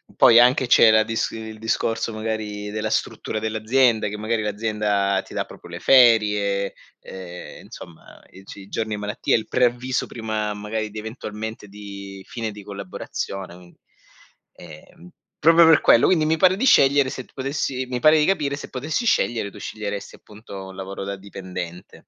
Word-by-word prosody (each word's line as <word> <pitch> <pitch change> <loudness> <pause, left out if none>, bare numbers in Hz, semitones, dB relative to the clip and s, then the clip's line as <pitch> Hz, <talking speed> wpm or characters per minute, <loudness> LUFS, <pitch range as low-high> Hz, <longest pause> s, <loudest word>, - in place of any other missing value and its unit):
poi 115 - +6
anche 125 +1 +4
c'era 110 -2 +6
dis 115 0 -2
il 110 -1 -8
discorso 115 0 -1
magari 110 -1 -4
della 110 0 -3
struttura 110 0 -2
dell'azienda, 110 +1 +1
che 105 - -6
magari 110 +1 -1
l'azienda 105 -2 0
ti - - -13
dà - - -2
proprio - - -14
le - - -8
ferie, 105 -6 +4 0.3
ehm, 90 -2 -10
insomma, 85 -2 -13
i 95 - -15
ci 100 - -11
i 95 - -13
giorni 110 -1 -3
di - - -7
malattia, 105 0 -1
il 110 - -2
preavviso 125 +1 0
prima 110 -2 -3
magari 105 +1 -4
di 110 - -6
eventualmente, 110 -1 -7
di 100 -1 -10
fine 115 -2 -4
di 105 0 -11
collaborazione, 95 -1 -6
quin 90 -1 -17 0.8
ehm, 90 +1 -14 0.3
proprio 165 +1 +6
per 160 -2 +6
quello. 115 - +5
Quindi 160 -4 +3
mi 160 +1 +1
pare 185 +2 +4
di 260 - 0
scegliere, 140 - +5
se 130 - -6
tu - - -28
potessi 135 -1 -3
mi 125 -1 -2
pare 155 +4 +5
di 150 - +3
capire 150 -7 0
se 140 - -9
potessi 155 - -3
scegliere, 115 - +1
tu - - -14
sceglieresti 105 -1 -6
appunto 105 -2 -11
un 95 - -11
lavoro 95 +1 -6
da 100 0 -4
dipendente. 90 -3 -8
110 Hz, 170 wpm, -22 LUFS, 100-125 Hz, 0.8 s, poi